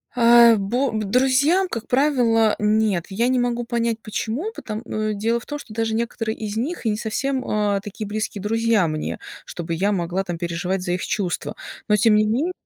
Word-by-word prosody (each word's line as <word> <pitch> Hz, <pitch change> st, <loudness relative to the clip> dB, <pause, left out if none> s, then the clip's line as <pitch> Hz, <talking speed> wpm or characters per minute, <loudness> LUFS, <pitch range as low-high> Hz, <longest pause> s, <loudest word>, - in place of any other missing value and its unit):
а, 235 Hz, -1 st, +7 dB
бо 240 Hz, +7 st, 0 dB
друзьям, 260 Hz, -, +2 dB
как 230 Hz, -6 st, -5 dB
правило, 245 Hz, -5 st, +3 dB
нет. 210 Hz, -4 st, +1 dB
Я 230 Hz, +5 st, 0 dB
не 255 Hz, 0 st, +2 dB
могу 240 Hz, -1 st, 0 dB
понять, 235 Hz, -1 st, -1 dB
почему, 235 Hz, -, -3 dB
пото 215 Hz, -, -6 dB
м, 215 Hz, -2 st, -2 dB
дело 230 Hz, +3 st, 0 dB
в -, -, -15 dB
том, 295 Hz, 0 st, -5 dB
что 215 Hz, -, -11 dB
даже 225 Hz, -1 st, -1 dB
некоторые 225 Hz, -1 st, -2 dB
из 215 Hz, 0 st, -4 dB
них 280 Hz, +3 st, -3 dB
и -, -, +3 dB
не 210 Hz, -, 0 dB
совсем, 260 Hz, +5 st, -2 dB
а, 205 Hz, -2 st, +1 dB
такие 205 Hz, +1 st, -7 dB
близкие 210 Hz, -1 st, -3 dB
друзья 225 Hz, -3 st, +2 dB
мне, 155 Hz, 0 st, -3 dB, 0.3 s
чтобы 170 Hz, -1 st, -5 dB
я 200 Hz, +5 st, +1 dB
могла 180 Hz, 0 st, -1 dB
там 175 Hz, -3 st, -5 dB
переживать 175 Hz, +2 st, -2 dB
за 175 Hz, -1 st, -2 dB
их 180 Hz, -, -2 dB
чувства, 190 Hz, -5 st, -2 dB, 0.3 s
но 210 Hz, -, +4 dB
тем 215 Hz, 0 st, +4 dB
не 215 Hz, -, +4 dB
мен 265 Hz, +12 st, 0 dB
220 Hz, 195 wpm, -22 LUFS, 205-240 Hz, 0.3 s, а